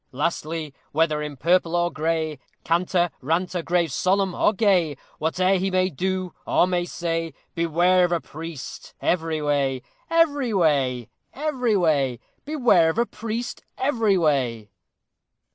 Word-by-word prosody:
Lastly, 155 +1 -2 0.2
whether 155 -1 +2
in 150 -2 -5
purple 170 +3 +2
or 175 0 +1
gray, 160 -2 -1 0.2
Canter, 175 +1 +1
ranter, 175 +5 -1
grave, 170 -1 0
solemn, 190 +5 +1
or - - +3
gay, 185 - +2 0.2
Whate'er 185 +5 +2
he 190 +1 0
may 185 0 +1
do 185 +3 -2
or - - +4
may 180 -1 0
say, 165 -3 -3 0.2
Beware 175 +2 +3
of 175 - +1
a 170 - +2
priest 160 -3 -9
every 160 -3 0
way! 140 -3 0 0.3
Every 290 -8 +2
way! 135 - +1 0.2
every 260 -7 0
way! 140 -8 +1 0.3
Beware 245 - +4
of 160 - -2
a 235 - +3
priest 230 +2 -5
every 230 -7 +2
way! 125 - 0
170 Hz, 135 wpm, -24 LUFS, 155-190 Hz, 0.3 s, or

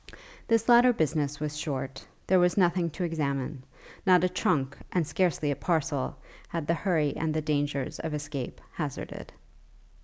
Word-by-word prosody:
This 230 -1 +2
latter 245 +1 +7
business 150 -5 0
was 150 0 -3
short; 135 -3 -4 0.2
there 185 0 +4
was 180 +2 +3
nothing 175 -2 +3
to 170 +4 -5
examine: 140 -4 -2 0.4
not 180 -3 +5
a 185 - +3
trunk, 140 -6 0 0.2
and 175 -3 +1
scarcely 155 -1 +1
a - - 0
parcel, 160 -5 -1 0.3
had 165 -3 -3
the 170 - +2
hurry 165 -6 +1
and 160 -1 -1
the 155 - +1
dangers 145 -3 -1
of 160 -2 -3
escape 145 -3 -5
hazarded. 150 -5 -5
155 Hz, 155 wpm, -28 LUFS, 145-175 Hz, 0.4 s, latter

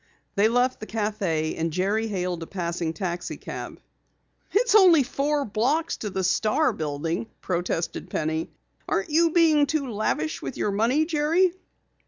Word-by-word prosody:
They 205 +1 +4
left 245 +2 +1
the 215 - -8
café 205 -8 -1
and 165 0 0
Jerry 200 +6 0
hailed 180 -4 -2
a 165 - -6
passing 170 -3 -3
taxicab. 175 +1 -5 0.7
"It's 470 +3 +2
only 360 -8 +7
four 285 +2 -1
blocks 270 +11 0
to 210 - -4
the 190 -1 -2
Star 220 - +2
building," 160 +6 -3
protested 175 -2 -2
Penny. 160 +1 -2 0.4
"Aren't 195 +8 -1
you 330 +2 +4
being 315 -3 +4
too 280 -4 -1
lavish 155 -8 -1
with 135 - -6
your 210 - 0
money, 235 +10 +2
Jerry?" 330 +3 +2
215 Hz, 145 wpm, -25 LUFS, -, 0.7 s, only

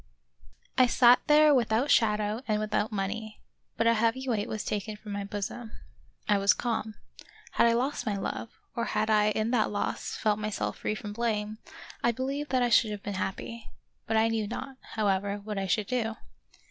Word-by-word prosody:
I 255 - +7
SAT 245 0 +6
there 300 0 +6
without 245 +2 +2
shadow 210 0 +2
and 215 -1 +1
without 215 0 -1
money, 215 +2 -4 0.4
but 230 - +1
a 230 - +5
heavy 230 +4 0
weight 215 -4 0
was 215 - -3
taken 210 +1 -3
from 210 0 -9
my 200 0 -3
bosom. 205 +3 -5 0.5
I 205 -1 +3
was 200 +1 +4
calm. 225 -3 -2 0.6
Had - - +4
I 230 - +4
lost 250 +1 -1
my 205 -2 0
love, 195 +3 -4 0.3
or 235 - -1
had 215 0 0
I 210 0 +4
in 215 +2 0
that 230 -4 +2
loss 205 - -3
felt 215 -1 +1
myself 215 -1 -3
free 215 - -1
from 210 -1 -6
blame, 215 -1 -2 0.4
I 235 - +4
believe 275 +5 -3
that 255 -1 +2
I 245 - +2
should 230 -1 +5
have 210 -1 -6
been 205 - -4
happy; 230 +4 -5 0.4
but 225 - +1
I 220 +1 +4
knew 225 -2 -1
not, 265 +4 -6 0.2
however, 200 -1 0
what 205 0 -5
I 195 - -2
should 205 +3 +1
do. 225 -1 -1
220 Hz, 190 wpm, -28 LUFS, 210-235 Hz, 0.6 s, I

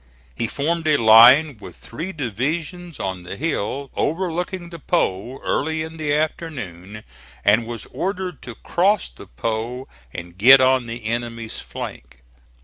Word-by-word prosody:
He 115 - -2
formed 160 +6 -2
a 150 -1 +4
line 120 +5 +7
with - - -11
three 165 +11 -7
divisions 155 - -4
on 95 -2 -3
the 90 +2 -7
hill 140 -2 -3
overlooking 175 +1 -2
the 170 - -8
Po 115 0 -1
early 160 +2 -1
in 160 +1 -8
the 155 -2 -2
afternoon, 120 - -3 0.4
and 110 +3 +4
was 115 -2 -6
ordered 185 -4 -3
to 120 -2 -9
cross 190 - +1
the - - -14
Po 115 - -4 0.2
and 85 +4 -9
get 130 +6 +9
on 130 -1 +3
the 115 0 -7
enemy's 115 0 -3
flank. 60 +1 -9
130 Hz, 140 wpm, -21 LUFS, 110-160 Hz, 0.4 s, get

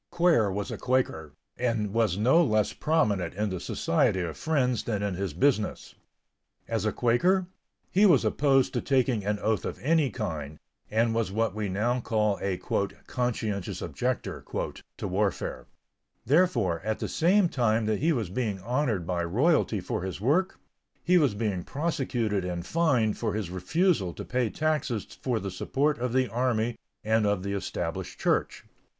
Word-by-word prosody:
Quare 165 - +3
was 100 +1 -3
a - - -5
Quaker, 100 - 0 0.3
and 115 -5 0
was 110 -5 +2
no 130 +11 +5
less 110 -7 +1
prominent 105 - 0
in 105 0 -1
the 95 - -3
Society 95 +1 +1
of 85 -3 -4
Friends 125 -7 0
than 105 -3 -1
in 100 -2 -1
his 95 0 -3
business. 110 - 0 0.7
As 110 -2 -1
a 110 - +2
Quaker, 175 - +2 0.5
he 205 +3 +5
was 140 - +4
opposed 135 +3 +2
to - - 0
taking 130 -5 +1
an 105 +1 0
oath 110 -3 +1
of - - -4
any 155 0 +2
kind, 75 - -5 0.3
and 115 +1 +2
was 115 -4 0
what 110 0 0
we 105 -1 -3
now 115 +6 0
call 105 -3 0
a 95 -2 -1 0.5
"conscientious 110 -6 -2
objector" 125 0 -3 0.5
to - - -4
warfare. 100 +1 -2 0.6
Therefore, 125 - +2
at 110 0 -1
the - - -3
same 185 +3 +3
time 115 -6 +1
that 110 -1 0
he 165 +3 +2
was 115 - -1
being 105 -3 -2
honored 120 - -1
by 85 0 -1
royalty 115 - +2
for 90 - -3
his 95 0 -5
work, 155 - +1 0.5
he 180 +1 +4
was 140 -9 +2
being 100 -4 -1
prosecuted 125 - -1
and 90 -1 -4
fined 130 - +1
for 110 -3 -1
his 100 -5 -3
refusal 105 - +1
to - - -7
pay 125 -3 0
taxes 150 -8 -1 0.2
for 125 -4 0
the 100 -1 -5
support 140 +11 0
of 125 0 -1
the 130 +1 +2
army 120 0 0 0.2
and 110 -1 +2
of 100 -2 0
the 100 0 -2
Established 100 - -4
Church. - - 0
110 Hz, 165 wpm, -27 LUFS, 100-135 Hz, 0.7 s, no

